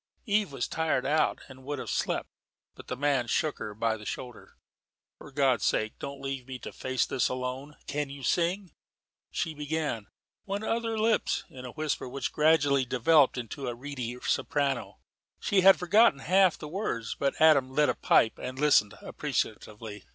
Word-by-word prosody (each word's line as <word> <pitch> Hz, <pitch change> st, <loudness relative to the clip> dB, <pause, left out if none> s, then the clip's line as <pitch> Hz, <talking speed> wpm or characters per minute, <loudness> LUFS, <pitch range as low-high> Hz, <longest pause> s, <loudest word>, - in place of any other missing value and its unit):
Eve 210 Hz, -, +1 dB
was 135 Hz, -3 st, -2 dB
tired 160 Hz, -5 st, 0 dB
out 155 Hz, +1 st, +1 dB
and 130 Hz, -1 st, -13 dB
would 145 Hz, +2 st, -4 dB
have -, -, -6 dB
slept, -, -, -1 dB, 0.5 s
but -, -, -13 dB
the 125 Hz, -, -4 dB
man 140 Hz, -3 st, +1 dB
shook 155 Hz, +5 st, 0 dB
her 105 Hz, -1 st, -6 dB
by 115 Hz, +1 st, 0 dB
the 105 Hz, -, -12 dB
shoulder. 125 Hz, +3 st, -8 dB, 0.6 s
"For 150 Hz, -, -12 dB
God's 135 Hz, -5 st, +2 dB
sake 110 Hz, 0 st, 0 dB
don't 140 Hz, 0 st, -7 dB
leave 135 Hz, -2 st, -4 dB
me 130 Hz, -1 st, -6 dB
to -, -, -8 dB
face 130 Hz, 0 st, -1 dB
this 125 Hz, -, 0 dB
alone. 130 Hz, +3 st, -5 dB
Can 145 Hz, 0 st, -2 dB
you 140 Hz, -1 st, -9 dB
sing?" 180 Hz, +5 st, 0 dB, 0.6 s
She 160 Hz, -2 st, -2 dB
began 150 Hz, -7 st, -3 dB, 0.4 s
"When 200 Hz, +1 st, -3 dB
other 225 Hz, 0 st, -1 dB
lips.. 220 Hz, 0 st, +1 dB
." -, -, -32 dB
in 130 Hz, -1 st, -9 dB
a 125 Hz, -, -7 dB
whisper 155 Hz, -4 st, -2 dB
which 135 Hz, +2 st, -4 dB
gradually 145 Hz, -3 st, +3 dB
developed 130 Hz, +3 st, +3 dB
into 125 Hz, +3 st, -5 dB
a 120 Hz, -, -3 dB
reedy 125 Hz, -2 st, -5 dB
soprano. 140 Hz, -5 st, -1 dB, 0.4 s
She 195 Hz, -2 st, +2 dB
had 195 Hz, +1 st, +8 dB
forgotten 205 Hz, +1 st, +4 dB
half 185 Hz, +1 st, +4 dB
the 150 Hz, -, -8 dB
words, 150 Hz, -, -3 dB
but 140 Hz, -1 st, 0 dB
Adam 150 Hz, -5 st, +5 dB
lit 150 Hz, +3 st, +2 dB
a -, -, +2 dB
pipe 110 Hz, -, +3 dB
and 130 Hz, +1 st, -6 dB
listened 135 Hz, -9 st, +3 dB
appreciatively. 105 Hz, -2 st, -4 dB
140 Hz, 175 wpm, -28 LUFS, 125-160 Hz, 0.6 s, had